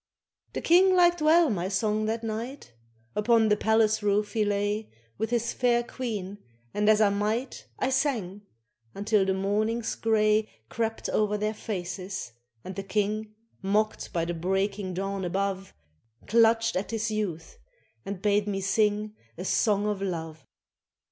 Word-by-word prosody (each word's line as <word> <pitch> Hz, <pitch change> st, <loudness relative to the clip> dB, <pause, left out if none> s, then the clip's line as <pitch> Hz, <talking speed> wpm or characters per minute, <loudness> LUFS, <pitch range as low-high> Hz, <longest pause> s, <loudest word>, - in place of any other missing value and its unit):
The -, -, -3 dB
King 370 Hz, +2 st, +5 dB
liked 350 Hz, -2 st, +4 dB
well 315 Hz, -1 st, +5 dB
my 180 Hz, -3 st, -1 dB
song 210 Hz, +2 st, 0 dB
that 225 Hz, +1 st, -2 dB
night; 225 Hz, -, -5 dB, 0.4 s
Upon 220 Hz, +1 st, +3 dB
the 210 Hz, -, +5 dB
palace 220 Hz, 0 st, +2 dB
roof 210 Hz, 0 st, +1 dB
he 220 Hz, -2 st, +2 dB
lay 205 Hz, +1 st, -1 dB, 0.3 s
With 220 Hz, 0 st, -1 dB
his 235 Hz, -1 st, 0 dB
fair 240 Hz, -1 st, +2 dB
Queen, 210 Hz, -6 st, -5 dB, 0.3 s
and 210 Hz, +1 st, +2 dB
as 215 Hz, -1 st, +5 dB
I 210 Hz, -, +5 dB
might 215 Hz, +6 st, -2 dB
I 260 Hz, -, 0 dB
sang, 225 Hz, -, -1 dB, 0.5 s
until 205 Hz, 0 st, +2 dB
the 190 Hz, -, +1 dB
morning's 215 Hz, +4 st, 0 dB
grey 215 Hz, -1 st, +2 dB, 0.2 s
Crept 225 Hz, -1 st, -2 dB
o'er 210 Hz, -1 st, +1 dB
their 210 Hz, +1 st, -1 dB
faces, 185 Hz, -, -5 dB, 0.3 s
and 185 Hz, -, -7 dB
the 195 Hz, -, -3 dB
King, 210 Hz, +2 st, -2 dB, 0.3 s
Mocked 210 Hz, +2 st, 0 dB
by 170 Hz, -1 st, 0 dB
the 175 Hz, -, -2 dB
breaking 190 Hz, +2 st, -1 dB
dawn 195 Hz, +1 st, -3 dB
above, 195 Hz, +1 st, -2 dB, 0.5 s
Clutched 225 Hz, 0 st, +3 dB
at 185 Hz, +2 st, -2 dB
his 220 Hz, -1 st, -2 dB
youth 210 Hz, -, -4 dB, 0.4 s
and 195 Hz, -2 st, -6 dB
bade 205 Hz, 0 st, +2 dB
me 195 Hz, -1 st, -1 dB
sing 210 Hz, +2 st, +1 dB, 0.2 s
A 180 Hz, -, -5 dB
song 205 Hz, 0 st, +2 dB
of 210 Hz, -2 st, -1 dB
love. 165 Hz, -5 st, -5 dB
210 Hz, 150 wpm, -27 LUFS, 195-225 Hz, 0.5 s, King